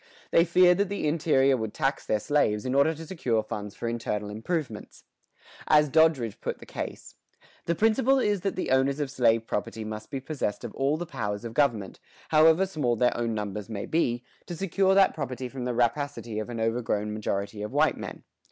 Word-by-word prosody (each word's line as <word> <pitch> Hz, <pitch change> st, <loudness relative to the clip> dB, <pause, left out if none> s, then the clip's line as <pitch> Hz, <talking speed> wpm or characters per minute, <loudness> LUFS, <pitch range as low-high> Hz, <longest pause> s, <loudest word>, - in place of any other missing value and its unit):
They 165 Hz, -, +5 dB
feared 180 Hz, +1 st, +5 dB
that 200 Hz, -2 st, +1 dB
the 200 Hz, -6 st, -2 dB
interior 145 Hz, -4 st, +3 dB
would 110 Hz, -3 st, -4 dB
tax 135 Hz, -2 st, -1 dB
their 110 Hz, -, +1 dB
slaves 105 Hz, -5 st, +1 dB
in 130 Hz, -, -1 dB
order 140 Hz, +4 st, +3 dB
to 165 Hz, +1 st, -9 dB
secure 125 Hz, -11 st, -1 dB
funds 105 Hz, -1 st, -6 dB
for 115 Hz, -, -4 dB
internal 105 Hz, -3 st, -3 dB
improvements. 115 Hz, +1 st, -4 dB, 0.6 s
As 150 Hz, -1 st, +5 dB
Doddridge 150 Hz, -7 st, +2 dB
put -, -, -3 dB
the -, -, -13 dB
case:[115:1] -, -, -9 dB, 0.2 s
The 170 Hz, -, 0 dB
principle 225 Hz, +7 st, +3 dB
is 210 Hz, -7 st, +1 dB
that 195 Hz, +1 st, -2 dB
the 185 Hz, -, -2 dB
owners 135 Hz, +2 st, +2 dB
of 145 Hz, -3 st, -2 dB
slave 115 Hz, -4 st, +2 dB
property 110 Hz, +1 st, -3 dB
must 110 Hz, 0 st, -7 dB
be 135 Hz, -, -4 dB
possessed 130 Hz, -6 st, -3 dB
of -, -, -6 dB
all 140 Hz, +3 st, 0 dB
the 175 Hz, -, -4 dB
powers 105 Hz, -7 st, -4 dB
of 115 Hz, -, -6 dB
government, 115 Hz, -8 st, 0 dB, 0.3 s
however 160 Hz, +4 st, +5 dB
small 150 Hz, -10 st, -1 dB
their 125 Hz, +2 st, +2 dB
own 115 Hz, -1 st, -1 dB
numbers 105 Hz, 0 st, -4 dB
may 100 Hz, -3 st, -4 dB
be, 125 Hz, -7 st, 0 dB, 0.2 s
to 175 Hz, -, -5 dB
secure 190 Hz, +2 st, +1 dB
that 195 Hz, 0 st, +5 dB
property 130 Hz, -4 st, -4 dB
from 125 Hz, 0 st, -6 dB
the 125 Hz, -1 st, -2 dB
rapacity 120 Hz, -2 st, -1 dB
of 110 Hz, -, -5 dB
an 120 Hz, -1 st, -5 dB
overgrown 110 Hz, -2 st, -1 dB
majority 100 Hz, -1 st, -3 dB
of 105 Hz, -, -4 dB
white -, -, +3 dB
men. -, -, -8 dB
130 Hz, 200 wpm, -27 LUFS, 110-160 Hz, 0.6 s, They